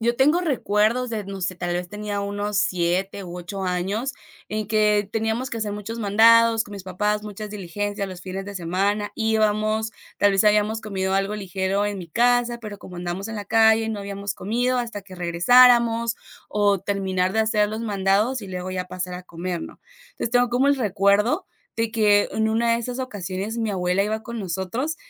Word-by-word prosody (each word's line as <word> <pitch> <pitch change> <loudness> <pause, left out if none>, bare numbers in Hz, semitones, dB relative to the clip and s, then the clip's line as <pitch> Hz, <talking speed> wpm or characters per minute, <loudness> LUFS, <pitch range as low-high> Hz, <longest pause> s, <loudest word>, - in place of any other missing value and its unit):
yo 235 +1 +1
tengo 300 +6 +4
recuerdos 245 - +1
de, 220 -3 -3
no 195 -1 -7
sé, 185 +1 -2
tal 175 0 -3
vez 175 0 -3
tenía 205 0 -4
unos 205 0 -2
7 190 -1 0
u 180 0 -7
8 190 +3 -6
años, 195 +8 -1 0.4
en 215 0 -3
que 210 -2 +2
teníamos 225 +3 -1
que 230 - -4
hacer 215 -2 -2
muchos 220 +3 -6
mandados 225 +2 +5
con 205 - -12
mis 200 - -7
papás, 210 +3 -1
muchas 210 0 -7
diligencias 205 +1 -4
los 185 -1 -8
fines 190 +1 -5
de 200 0 -8
semana, 195 +4 -1
íbamos, 220 0 +1 0.3
tal 205 0 +4
vez 195 - +3
habíamos 210 +1 +3
comido 190 -3 -2
algo 195 +2 0
ligero 195 +1 -1
en 205 - -3
mi 175 -2 -8
casa, 240 +4 +2
pero 215 -3 -8
como 180 -3 -11
andamos 175 +3 -4
en 225 - -5
la 205 - -5
calle, 220 +1 +4
no 215 -2 -3
habíamos 200 0 -4
comido 245 +6 0
hasta 230 -4 -4
que 190 -1 -13
regresáramos, 230 +6 +4 0.3
o 205 -2 +2
terminar 190 -2 -1
de 220 - -1
hacer 215 -1 +2
los 220 +1 -4
mandados 210 +3 +1
y 200 - -8
luego 185 0 -5
ya 185 -1 -3
pasar 180 0 -5
a 180 - -7
comer, 175 0 -5
¿no? - - -10 0.3
Entonces, 360 - -4
tengo 245 0 +4
como 250 +3 +2
un 285 - +5
recuerdo 205 -2 +2 0.3
de 225 0 0
que 210 -2 +3
en 220 0 0
una 230 +1 +2
de - - 0
esas 245 +2 -4
ocasiones, 205 -2 -4
mi 225 -1 -1
abuela 185 0 +1
iba 220 +1 -2
con 235 +1 -6
nosotros 195 - -3
205 Hz, 195 wpm, -23 LUFS, 190-225 Hz, 0.4 s, mandados